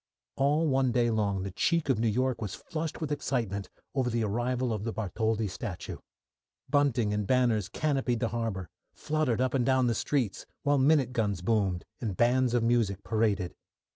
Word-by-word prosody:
All 150 +4 +2
one 135 -2 +2
day 120 -1 +2
long 100 -3 0
the 100 - -4
cheek 165 - +1
of 130 -5 +2
New 115 - +2
York 125 +3 0
was 100 -4 -3
flushed 160 -1 -5
with 155 -2 -2
excitement 115 -9 -2 0.2
over 130 -3 +1
the 115 -1 0
arrival 120 +3 0
of 105 -2 -3
the 115 - -2
Bartholdi 110 +1 -1
statue. 90 0 -5 0.7
Bunting 130 -7 +2
and 105 -1 -1
banners 120 -6 +2
canopied 135 -6 0
the 115 - +1
harbour, 110 -6 -3 0.3
fluttered 150 -6 0
up 130 -1 +1
and 130 -3 +2
down 130 +1 +3
the 120 - +2
streets, 120 -3 -1 0.2
while 145 -1 +3
minute 135 -2 +3
guns 100 -6 -1
boomed, 95 -4 +1
and 105 -7 -3
bands 125 +1 +3
of 120 - +2
music 115 -5 +1
paraded. 105 -5 0
120 Hz, 175 wpm, -29 LUFS, 105-130 Hz, 0.7 s, down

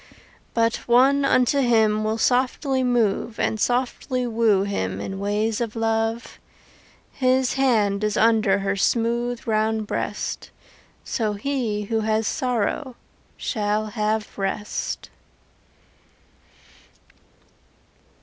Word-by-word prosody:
But 230 0 +2
one 265 +4 +4
unto 265 0 +3
him 220 -4 +3
Will 215 +1 -1
softly 260 +3 +1
move 230 -2 0
And 220 - 0
softly 250 +1 -1
woo 225 -4 +2
him 95 - -3
In 195 - -5
ways 210 +3 -1
of 230 -2 -3
love. 225 +1 -1 0.7
His 255 -1 +1
hand 215 -7 +2
is 210 0 0
under 220 -3 +3
Her 195 0 -1
smooth 235 +3 0
round 220 0 0
breast; - - -4 0.5
So 215 -4 -1
he 220 -2 -2
who 225 +2 -1
has 220 0 0
sorrow 250 +3 -1 0.4
Shall 215 -1 -1
have 215 -1 -2
rest. 195 +2 -3
225 Hz, 100 wpm, -23 LUFS, 210-245 Hz, 0.7 s, one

